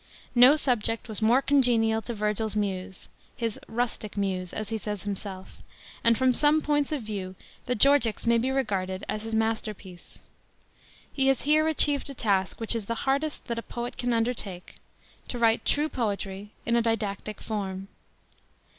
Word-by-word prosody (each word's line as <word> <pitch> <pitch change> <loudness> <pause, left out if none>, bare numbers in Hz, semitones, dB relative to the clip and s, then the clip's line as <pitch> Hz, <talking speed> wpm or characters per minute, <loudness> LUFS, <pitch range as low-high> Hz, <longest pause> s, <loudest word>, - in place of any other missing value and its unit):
No 250 +4 +8
subject 235 -6 0
was 220 -1 -5
more 240 +5 +4
congenial 235 -6 +3
to 235 +1 -5
Virgil's 210 0 -1
Muse 190 -2 -3 0.2
— - - -33
his 230 -2 -2
"rustic 225 -3 -3
Muse," 185 -3 -1
as 215 -1 -5
he 225 - -1
says 210 -2 -5
himself; 195 -2 -6 0.5
and 230 -1 +4
from 260 -1 +3
some 295 +4 +4
points 295 -2 0
of 290 -6 -1
view 195 -3 -5 0.3
the 250 - +1
Georgics 250 -3 +3
may 235 0 +4
be 250 +3 0
regarded 195 -8 -1
as 215 0 -3
his 225 0 -4
masterpiece. 215 -5 -3 1.0
He 270 -1 +2
has 270 -2 +2
here 310 +2 +3
achieved 290 -3 +2
a 275 - -7
task, 195 -5 0
which 225 0 +3
is 220 -3 -3
the 230 - -1
hardest 280 +3 0
that 235 -1 -3
a - - -4
poet 240 +1 -6
can 245 -1 -1
undertake, 225 -6 -2 0.5
to 245 - -4
write 230 -1 +3
true 295 +2 +2
poetry 205 -6 -3 0.2
in 235 - +2
a 235 - +4
didactic 215 -2 -2
form. 195 -3 -4
225 Hz, 170 wpm, -27 LUFS, 205-250 Hz, 1.0 s, No